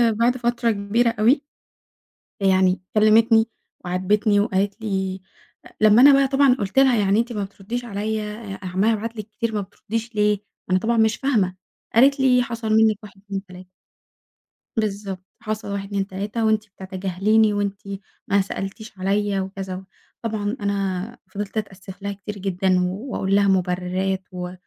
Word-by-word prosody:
بعد 240 +3 +2
فترة 240 -1 +1
كبيرة 215 +4 +1
أوي، 260 +7 +4 1.0
يعني 185 -1 +3
كلّمتني 220 +1 +5 0.4
وعاتبتني 205 +3 +2
وقالت 200 +1 0
لي 190 -3 -2 0.4
أ - - -12
لمّا 215 +3 +7
أنا 280 +1 +9
بقى 275 0 +4
طبعًا 270 -1 +4
قُلت 205 +2 0
لها 265 -3 +5
يعني 205 +1 +3
أنتِ 235 +1 -1
ما 205 - -2
بترديش 205 +5 -6
عليَّ 215 0 -2 0.3
أ - - -12
عمّالة 190 +5 +2
ابعت 225 +1 -4
لِك 215 0 -6
كتير 220 +1 -3
ما 205 - 0
بترديش 220 +4 -5
ليه؟ 210 -1 +2 0.3
أنا 185 - +4
طبعًا 230 +3 0
مش 220 0 +3
فاهمة 210 -10 +1 0.4
قالت 275 +4 +5
لي 250 -2 +4
حصل 230 -2 -4
منِّك 220 -1 +4
1 195 -2 -13
2 195 -1 -5
3. 185 0 -13 1.1
بالضبط، 200 -3 -3 0.2
حصل 215 -1 -4
1 200 0 -3
2 195 -1 -2
3 205 +4 -3
وأنتِ 215 -1 +2 0.2
بتتجاهليني، 195 +3 +1
وأنتِ 200 -1 -2 0.5
ما 200 -1 +3
سألتيش 195 +2 -6
عليَّ 200 +1 +1
وكذا 190 0 -5
و 190 - -8 0.4
طبعًا 215 0 -2
أنا 200 +2 -2
فضلت 205 +1 -5
أتأسف 195 -2 -6
لها 200 0 -3
كتير 205 +1 -8
جدًا، 190 -1 +1
واقول 195 -1 -2
لها 200 0 +4
مُبرّرات 185 0 0
و 180 0 -5
205 Hz, 155 wpm, -22 LUFS, 195-225 Hz, 1.1 s, أنا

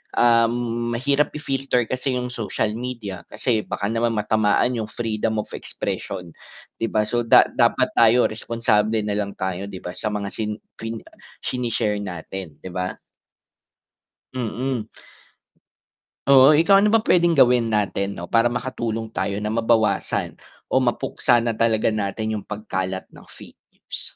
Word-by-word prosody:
uhm, 120 0 +2
mahirap 140 +4 +1
i-filter 135 -4 0
kasi 130 +3 -2
yung 125 0 -3
social 110 -2 -2
media, 115 -6 -5
kasi 120 -4 0
baka 100 - -4
naman 115 0 0
matamaan 110 +2 +2
yung 110 - -3
"Freedom 110 -1 -2
of - - -21
expression." 90 -2 -5 0.5
'Di 115 - 0
ba? 110 -1 +1
So, 120 +3 -1
da - - +8
dapat - - +2
tayo 115 +1 +5
responsable 110 -1 +1
nalang 105 -1 -2
tayo 95 +1 -3
'di 95 -2 -9
ba, 90 - -5
sa 110 - -4
mga 105 -2 -3
sin 105 -1 -3 0.2
fin 115 0 -4 0.5
shine-share 115 -4 -1
natin, 90 -3 -7
'di 95 - -7
ba? 90 +1 -3 1.4
Mm. 125 -1 -2 1.4
Oo, 135 +1 +8
ikaw 170 +6 +5
ano 210 +1 +3
ba 225 - +5
p'wedeng 175 -5 +3
gawin 125 -6 +4
natin 100 -1 0
'no, 85 - -7
para 120 +1 +3
makatulong 115 -3 -3
tayo 100 0 -1
na 105 - -2
mabawasan 115 0 +1 0.3
o - - 0
mapuksa 120 -1 +1
na 115 -1 -1
talaga 115 -1 +2
natin 110 +1 -2
yung 105 - -6
pagkalat 95 -3 -4
ng - - -16
fake - - -14
news? - - -6
115 Hz, 145 wpm, -22 LUFS, 105-120 Hz, 1.4 s, da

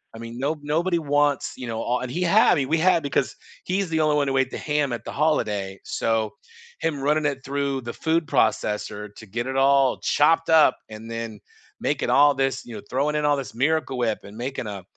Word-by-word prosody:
I - - -8
mean, 115 +1 -8
no 150 +4 -1
nobody 170 +4 +1
wants," 145 -2 +1
you 125 -2 -7
know, 115 0 -3
o 125 +1 0
and 125 - -5
he 180 +7 -1
had 200 +6 +5
I - - +3
mean, 135 -3 -1
we 160 +1 +2
had, 170 -2 +3
because 140 -1 -1 0.3
he's 190 -1 -1
the 160 - 0
only 155 -1 +2
one 145 -1 +1
who 135 0 0
ate 130 -1 +2
the - - -5
ham 150 -3 -1
at 120 - -4
the - - -5
holiday, 105 -11 0
so 110 0 -1 0.5
him 155 -4 -1
running 150 +2 +1
it 135 -2 -4
through 140 -1 -2
the 120 0 -6
food 165 0 0
processor 105 -3 -1
to 110 - -11
get 115 +5 -3
it 130 - -3
all 135 -1 +3
chopped 165 +2 +2
up, 160 -2 +5
and 110 +1 -9
then 115 -2 -5 0.4
making - - -1
all 145 +1 +6
this 135 0 -1
you 120 - -9
know, 105 - -7
throwing 145 +4 0
in 150 - 0
all 145 -1 +3
this 135 - -6
Miracle 145 0 0
Whip, 110 -3 0
and 100 - -12
making 125 0 -4
a 100 -3 -6
135 Hz, 230 wpm, -24 LUFS, 115-150 Hz, 0.5 s, all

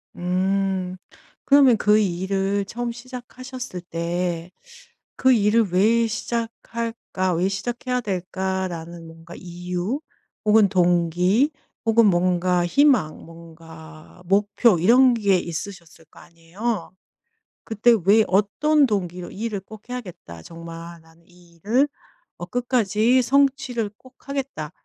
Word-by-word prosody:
음. 185 +1 -1 0.5
그러면 275 -5 +6
그 210 +1 +4
일을 195 +1 -1
처음 240 +3 -4
시작하셨을 250 -3 -8
때 170 0 -3 0.7
그 260 - +4
일을 210 -2 +2
왜 225 +5 +3
시작할까 230 -4 -3
왜 175 +3 +1
시작해야 245 +5 -3
될까라는 185 -4 -4
뭔가 165 +1 -13
이유 180 - -4 0.4
혹은 210 -1 +5
동기 180 - +2 0.3
혹은 225 0 +4
뭔가 180 -1 +2
희망 255 - +3
뭔가 165 0 -14
목표 200 +2 +3
이런 245 +8 +5
게 200 -5 +2
있으셨을 170 -1 -7
거 - - -16
아니에요. 180 +4 -5 0.7
그때 225 +2 +3
왜 215 +3 +6
어떤 280 - +2
동기로 180 -4 -3
'이 220 +4 -5
일을 205 -4 -3
꼭 220 +4 -14
해야겠다 180 - -8
정말. 165 0 -10
나는 165 +1 -23
이 175 -1 -22
일을 240 - +2 0.5
어 175 - -6
끝까지 240 +2 +1
성취를 265 -4 +1
꼭 260 +1 -20
하겠다.' 270 - -4
195 Hz, 230 characters per minute, -23 LUFS, 175-235 Hz, 0.7 s, 그러면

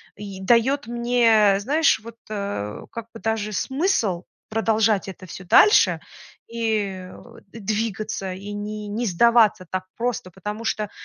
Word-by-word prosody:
и 200 -2 -8
даёт 240 +8 +2
мне, 235 -4 +3
знаешь, 300 +3 +3
вот, 230 +1 -12
э, 200 - -4
как 230 -1 -6
бы 225 - -11
даже 220 -2 -2
смысл 265 - 0 0.3
продолжать 220 -2 +1
это 185 0 -10
всё 185 +1 -9
дальше, 415 - +5 0.5
и, 230 -1 -1
э, 190 -3 -5
о 235 - -14
двигаться, 215 -2 -3
и 200 +3 -8
не 210 0 -5
не 225 +4 -2
сдаваться 220 0 +4
так 185 0 -3
просто, 235 -6 -2
потому 210 +5 -6
что 215 -2 -2
215 Hz, 140 wpm, -23 LUFS, 195-230 Hz, 0.5 s, дальше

